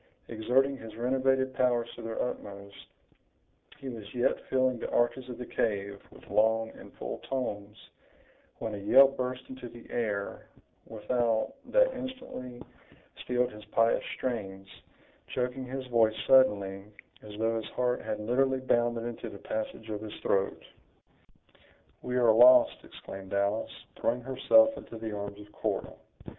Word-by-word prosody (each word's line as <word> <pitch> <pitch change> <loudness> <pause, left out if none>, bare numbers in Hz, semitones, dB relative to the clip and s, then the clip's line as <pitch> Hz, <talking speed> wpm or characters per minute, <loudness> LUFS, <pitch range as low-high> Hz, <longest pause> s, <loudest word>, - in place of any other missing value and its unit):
Exerting 130 +5 +2
his 110 -4 -10
renovated 130 +2 +1
powers 120 -2 +2
to - - -9
their 115 0 -5
utmost, 100 -4 -6 0.9
he 140 -2 -9
was 115 -4 -6
yet 120 - 0
filling 130 -2 +2
the - - -4
arches 125 +2 +1
of 125 - -6
the 125 - -6
cave 100 -3 -2
with - - -17
long 110 +1 +2
and - - -13
full - - -6
tones, 105 -6 -3 0.8
when 110 - -4
a 105 - -4
yell 135 +7 +7
burst 130 -1 -4
into 130 -2 -8
the 120 0 -13
air 105 -4 -2 0.4
without, 115 - 0
that - - +3
instantly 255 - -7 0.6
stilled 125 0 0
his 105 0 -11
pious 115 +2 +2
strains, 95 -6 -4 0.7
choking 125 +1 -2
his 130 +1 -5
voice 115 -3 +3
suddenly, 100 -7 +4 0.4
as 105 -1 -10
though 115 +1 +1
his 110 -1 -5
heart 125 0 +1
had - - -3
literally 130 +4 +1
bounded 120 -2 +1
into 120 -1 -5
the 100 - -9
passage 110 +1 -5
of 105 -1 -4
his 110 -1 -7
throat. 95 0 0 1.4
"We 125 - -3
are 120 -3 +5
lost!" 125 +3 +7
exclaimed 95 0 -8
Alice, 100 +2 -1
throwing 120 +2 0
herself 135 - +5
into 115 - -9
the 110 -1 -5
arms 100 0 -6
of 105 0 -13
Cora. - - -3
120 Hz, 145 wpm, -30 LUFS, 105-130 Hz, 1.4 s, yell